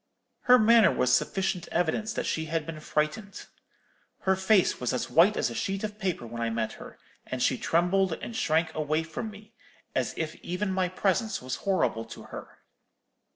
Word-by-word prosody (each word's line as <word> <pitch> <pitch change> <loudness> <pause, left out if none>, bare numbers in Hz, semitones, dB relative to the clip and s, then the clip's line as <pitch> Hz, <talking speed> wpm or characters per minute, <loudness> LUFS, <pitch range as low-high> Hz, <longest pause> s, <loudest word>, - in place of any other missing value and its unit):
"'Her 250 0 +8
manner 230 -1 +6
was 125 0 +3
sufficient 185 -2 -1
evidence 180 +6 0
that - - -2
she 160 - -1
had 160 -1 -2
been 160 -1 -6
frightened. 155 +7 -2 0.8
Her 190 0 +2
face 190 0 +3
was 125 - -1
as 125 - -2
white 185 +6 +5
as - - 0
a - - -5
sheet 200 -3 -2
of 210 0 -5
paper 185 - -2
when 115 0 -6
I 115 - 0
met 110 -1 -2
her, - - -11 0.3
and - - -4
she - - +2
trembled 180 +2 +1
and 230 - -7
shrank 160 -2 +1
away 155 +1 0
from 165 +7 -5
me, 210 +1 -14 0.4
as - - -1
if 160 -1 -2
even 185 +3 -3
my 185 -1 +1
presence 195 +4 0
was 130 0 -4
horrible 125 - +1
to 115 - -10
her.' - - -9
180 Hz, 185 wpm, -28 LUFS, 155-205 Hz, 0.8 s, Her